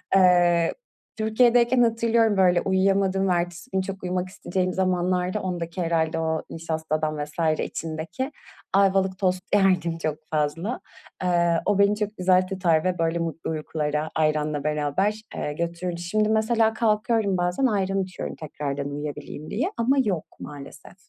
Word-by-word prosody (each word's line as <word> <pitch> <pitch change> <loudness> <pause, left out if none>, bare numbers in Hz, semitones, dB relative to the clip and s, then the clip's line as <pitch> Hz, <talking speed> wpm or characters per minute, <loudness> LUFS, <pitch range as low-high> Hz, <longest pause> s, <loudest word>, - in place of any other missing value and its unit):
Eee, 175 -2 +4 0.4
Türkiye'deyken 240 +3 +4
hatırlıyorum, 230 -2 +2
böyle, 180 -2 +4
uyuyamadığımın 195 0 +2
ertesi 175 +7 -3
günü 190 - +1
çok 195 0 -7
uyumak 180 0 -2
isteyeceğim 185 -1 -2
zamanlarda 185 +1 0
ondaki 175 -1 -4
herhâlde 165 -1 0
o 160 0 -1
nişastadan 155 -2 -2
vs. 155 +1 -1
içindeki, 165 - -4 0.4
Ayvalık 190 -1 +3
tost 185 -1 0
yerdim 180 -4 +2
çok 155 -2 -2
fazla. 160 +10 -1 0.4
Eee, 170 -2 +2
o 205 -1 +2
beni 200 +1 +4
çok 210 0 -3
güzel 185 0 +3
tutar 175 -5 +1
ve, 185 -1 0
böyle, 165 +1 +1
mutlu 165 -1 -3
uykulara, 155 -1 -2
ayranla 150 -2 0
beraber, 150 +8 0
eee, 150 - -3
götürürdü. 170 +2 -3
Şimdi 215 +5 +1
mesela 220 0 +2
kalkıyorum 215 -3 +1
bazen, 180 +9 0
ayran 195 -4 +1
içiyorum 185 -1 -6
tekrardan 145 -2 -4
uyuyabileyim 145 +1 -6
diye. 295 - -1
Ama 255 +4 +2
yok, 180 -6 -1
maalesef. 140 +3 -10
180 Hz, 135 wpm, -25 LUFS, 160-200 Hz, 0.4 s, Eee